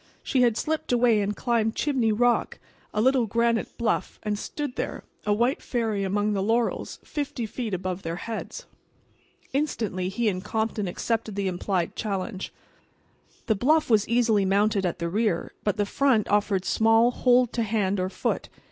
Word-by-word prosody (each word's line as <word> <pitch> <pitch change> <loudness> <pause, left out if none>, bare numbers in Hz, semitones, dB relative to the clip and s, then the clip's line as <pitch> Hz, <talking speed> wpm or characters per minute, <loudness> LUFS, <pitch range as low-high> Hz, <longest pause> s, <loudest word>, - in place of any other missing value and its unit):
She 260 - +1
had 235 -3 +3
slipped 315 -3 -2
away 235 -3 +4
and 205 +1 -1
climbed 230 -2 0
Chimney 260 -7 +1
Rock, 240 +3 +2 0.3
a 210 - -2
little 260 -2 +3
granite 230 +1 0
bluff, 235 - -1
and 210 -1 -1
stood 285 +5 -5
there, - - -4 0.2
a - - +3
white 240 +6 +1
fairy 225 -5 -1
among 205 +2 0
the 195 - 0
laurels, 230 +3 0
fifty 285 -6 -3
feet 220 +1 -4
above 185 0 -3
their 165 -1 -4
heads. 230 - -6 0.9
Instantly 220 -10 -1
he 225 +4 -1
and 185 -3 -1
Compton 220 -1 -1
accepted 220 +3 -2
the 200 -1 -1
implied 180 -1 -1
challenge. 195 -1 -3 0.9
The 220 - +3
bluff 290 +7 +2
was 210 -2 +3
easily 230 -4 +3
mounted 200 0 +2
at 175 - -3
the 170 -1 -2
rear, 205 -1 0
but 205 -1 0
the 205 - +1
front 245 -1 +2
offered 205 -2 +1
small 225 +2 +4
hold 250 -1 +3
to 235 - 0
hand 205 -3 0
or 185 0 0
foot. - - -2
220 Hz, 165 wpm, -26 LUFS, 200-240 Hz, 0.9 s, away